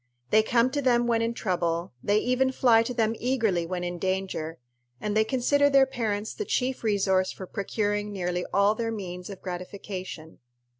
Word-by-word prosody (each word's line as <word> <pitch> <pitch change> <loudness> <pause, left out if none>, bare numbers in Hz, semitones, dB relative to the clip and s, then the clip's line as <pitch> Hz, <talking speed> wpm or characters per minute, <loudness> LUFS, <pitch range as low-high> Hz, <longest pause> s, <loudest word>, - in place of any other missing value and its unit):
They 215 - +6
come 235 +3 +2
to 285 +1 -1
them 240 -2 +3
when 230 -1 +2
in 230 +1 -1
trouble, 175 - -1
they 205 +1 +3
even 255 +3 +2
fly 240 -3 +5
to 230 +2 -3
them 225 -1 +2
eagerly 225 -9 +1
when 180 0 -3
in 175 0 -4
danger, 185 -4 -2 0.4
and 210 +5 -2
they 220 - +5
consider 275 +5 +2
their 275 -1 +6
parents 220 -5 -2
the - - -4
chief 260 - -1
resource 190 -3 +2
for 190 - -8
procuring 205 +2 -2
nearly 180 -2 -2
all 200 +2 +4
their 225 +1 -2
means 180 -4 -6
of 195 -2 -9
gratification. 180 -2 -7
210 Hz, 180 wpm, -27 LUFS, 185-240 Hz, 0.4 s, They